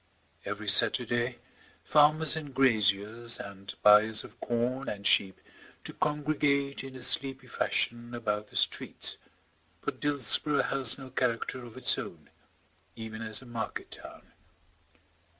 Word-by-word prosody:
Every 105 +1 -7
Saturday 120 +3 +3 0.5
farmers 155 +1 +3
and 145 -4 -8
graziers 115 -2 +1
and 100 -1 -10
buyers 110 +1 +5
of 115 - -16
corn 125 +3 -3
and 100 -1 -8
sheep 95 -1 +2 0.4
do - - -8
congregate 145 -2 -2
in 135 -1 -11
a 130 - -8
sleepy 135 -1 +3
fashion 120 -1 -2
about 105 -2 -4
the - - -17
streets, - - 0 0.6
but - - -6
Dillsborough 145 +1 +4
has 135 -4 +4
no 135 -2 -12
character 125 +1 -3
of 120 0 -13
its 130 - +3
own, - - -11 0.6
even 110 -1 -9
as 110 +3 0
a - - -16
market 120 -2 -7
town. - - -13
120 Hz, 130 wpm, -28 LUFS, 110-135 Hz, 0.6 s, buyers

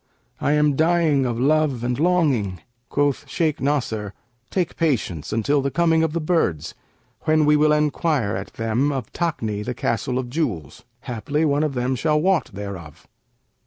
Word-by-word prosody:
I 145 - +1
am 150 -1 +3
dying 160 -4 +2
of 120 -1 -2
love 145 -2 +2
and 125 +1 -1
longing.' 145 - +1 0.3
Quoth 145 -1 0
Shaykh 160 -3 0
Nasr, 115 -8 -1 0.3
'Take 180 -3 -1
patience 115 - -1
until 140 +6 +1
the 140 - -1
coming 165 +2 +2
of 160 -1 0
the 170 - 0
birds, 155 - 0 0.5
when 155 -1 +3
we 150 0 +5
will 150 0 +4
enquire 150 - +1
at 95 +1 -6
them 115 +6 0
of 130 -6 -5
Takni, 115 -12 -2
the 125 +2 -4
Castle 120 +2 -1
of 130 -1 -2
Jewels; 115 - -3 0.2
haply 140 +6 -2
one 145 -1 +2
of 150 -3 -1
them 125 +1 0
shall 150 +4 +1
wot 185 +1 +1
thereof.' 95 -5 -8
140 Hz, 160 wpm, -22 LUFS, 115-155 Hz, 0.5 s, we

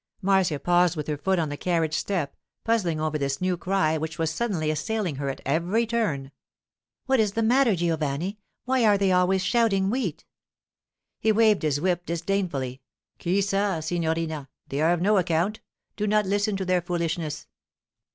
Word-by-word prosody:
Marcia 190 -6 +2
paused 175 +3 +3
with 150 -2 -3
her 150 - -2
foot 190 +6 0
on 160 -3 0
the 145 - -4
carriage 165 -3 0
step, 170 -5 -2 0.3
puzzling 185 -9 +1
over 155 -1 -1
this 140 -1 -1
new 185 0 0
cry 175 -3 0
which 160 0 -4
was 160 -1 0
suddenly 180 -10 -1
assailing 175 0 -2
her 140 0 -2
at 135 - -5
every 175 - +1
turn. 195 -13 -1 0.7
'What 265 -1 +2
is 210 -2 +2
the 225 - 0
matter, 240 -1 +4
Giovanni? 165 +3 -1 0.3
Why 255 -1 +2
are 210 -2 +5
they 195 -1 +2
always 185 +1 +3
shouting 200 -5 +2
"Wheat"?' 205 - -2 0.9
He 220 - +3
waved 215 -1 +4
his 150 -2 0
whip 175 +1 0
disdainfully. 165 -7 -2 0.4
'Chi 185 +3 +1
sa, 195 -2 0
signorina? 160 -3 -2 0.2
They 140 +2 -2
are 160 +2 +4
of 175 0 0
no 210 +1 +4
account. 175 +5 0 0.4
Do 210 -1 -1
not 210 0 +2
listen 205 +1 0
to 190 - -3
their 180 -1 +2
foolishness. 165 -3 -3
180 Hz, 170 wpm, -25 LUFS, 155-205 Hz, 0.9 s, are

